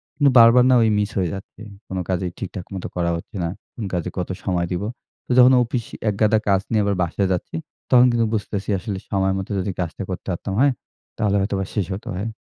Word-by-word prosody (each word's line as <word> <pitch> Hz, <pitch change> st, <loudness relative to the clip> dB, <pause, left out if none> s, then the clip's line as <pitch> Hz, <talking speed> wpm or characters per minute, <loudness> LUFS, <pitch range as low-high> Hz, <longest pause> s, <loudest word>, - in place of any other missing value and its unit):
কিন্তু 145 Hz, -2 st, +4 dB
বারবার 115 Hz, +2 st, +8 dB
না -, -, +6 dB
ওই 110 Hz, -, +3 dB
মিস 105 Hz, 0 st, 0 dB
হয়ে 90 Hz, -3 st, +1 dB
যাচ্ছে। 95 Hz, +2 st, -9 dB, 0.3 s
কোনো 95 Hz, -1 st, -3 dB
কাজেই 90 Hz, -1 st, -1 dB
ঠিকঠাক 95 Hz, -1 st, -6 dB
মতো 95 Hz, -, -4 dB
করা 85 Hz, -1 st, 0 dB
হচ্ছে 85 Hz, -, -8 dB
না। 85 Hz, -, -1 dB, 0.3 s
কোন 110 Hz, -, -5 dB
কাজে 90 Hz, -2 st, -1 dB
কত 90 Hz, -, -2 dB, 0.2 s
সময় 90 Hz, -2 st, 0 dB
দিবো। 95 Hz, +4 st, -2 dB, 0.4 s
তো -, -, -6 dB
যখন 125 Hz, +1 st, +8 dB
অফিস 120 Hz, 0 st, -2 dB, 0.3 s
একগাদা 110 Hz, +2 st, +3 dB
কাজ 95 Hz, -1 st, +3 dB
নিয়ে 110 Hz, -, +3 dB
আবার 100 Hz, -1 st, +1 dB
বাসায় 90 Hz, +3 st, 0 dB
যাচ্ছি, 90 Hz, -, -4 dB, 0.4 s
তখন 125 Hz, -1 st, +7 dB
কিন্তু 115 Hz, -1 st, +2 dB
বুঝতেছি 100 Hz, -1 st, -3 dB
আসলে 95 Hz, +1 st, -4 dB
সময় 95 Hz, -1 st, +1 dB
মতো 95 Hz, -, -5 dB
যদি 95 Hz, +1 st, -2 dB
কাজটা 90 Hz, +2 st, -3 dB
করতে 90 Hz, -, -6 dB
পারতাম, 95 Hz, +2 st, -4 dB
হ্যাঁ? 140 Hz, -1 st, +4 dB, 0.4 s
তাহলে 105 Hz, -2 st, +1 dB
হয়তোবা 95 Hz, 0 st, -1 dB
শেষ 100 Hz, -4 st, +1 dB
হতে 95 Hz, -, -7 dB
হয়। 95 Hz, +5 st, -3 dB
100 Hz, 215 wpm, -22 LUFS, 90-110 Hz, 0.4 s, বারবার